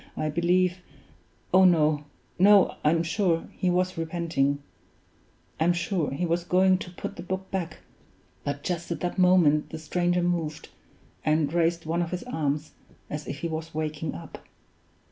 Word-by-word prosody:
I 155 - -1
believe 180 +3 +2 0.7
oh 190 +1 +7
no! 155 -4 +4 0.3
no! 200 +1 +6
I'm 165 +2 +3
sure 170 -1 0
he 185 - -1
was 180 0 0
repenting; 160 -4 0 1.0
I'm 170 +2 +3
sure 175 -2 -1
he 160 +6 -2
was 170 +1 0
going 185 +1 +3
to 185 - -7
put 180 - -7
the - - -6
book 190 +1 -5
back; 175 -4 -4 0.6
but 145 0 -4
just 175 -2 -3
at 170 - -3
that 180 +1 -2
moment 175 -5 +4
the 160 - -6
stranger 175 +2 0
moved, 165 -4 -2 0.5
and 155 -1 +1
raised 170 -1 +1
one 165 +2 0
of 170 - -2
his 180 0 -4
arms, 150 - -2 0.4
as 150 0 -5
if 140 - -6
he 170 - -1
was 160 -1 -5
waking 155 -1 -3
up. - - -10
170 Hz, 160 wpm, -26 LUFS, 155-180 Hz, 1.0 s, oh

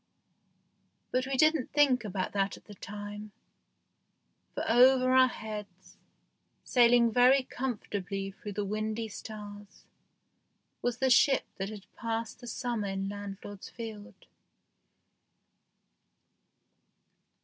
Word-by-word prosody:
But 255 +1 0
we 270 -1 -1
didn't 310 -2 +3
think 275 -5 +4
about 190 -3 -3
that 195 -1 -1
at - - -19
the 210 - -11
time; 205 +1 -8 1.2
for - - -2
over 255 +2 +5
our 260 0 +7
heads, 210 -6 -8 0.7
sailing 240 -1 +5
very 255 +3 +5
comfortably 200 -7 -4
through 205 +1 -8
the 205 +1 -2
windy 215 +2 -2
stars, 205 -1 -10 1.0
was 245 -1 -1
the 265 0 +2
ship 270 +2 +5
that 195 +1 -3
had 210 -3 -9
passed 230 -1 -4
the 245 - -10
summer 235 -4 -2
in 195 0 -3
landlord's 200 0 -8
field. 220 -3 -9
215 Hz, 105 wpm, -30 LUFS, 205-245 Hz, 1.2 s, our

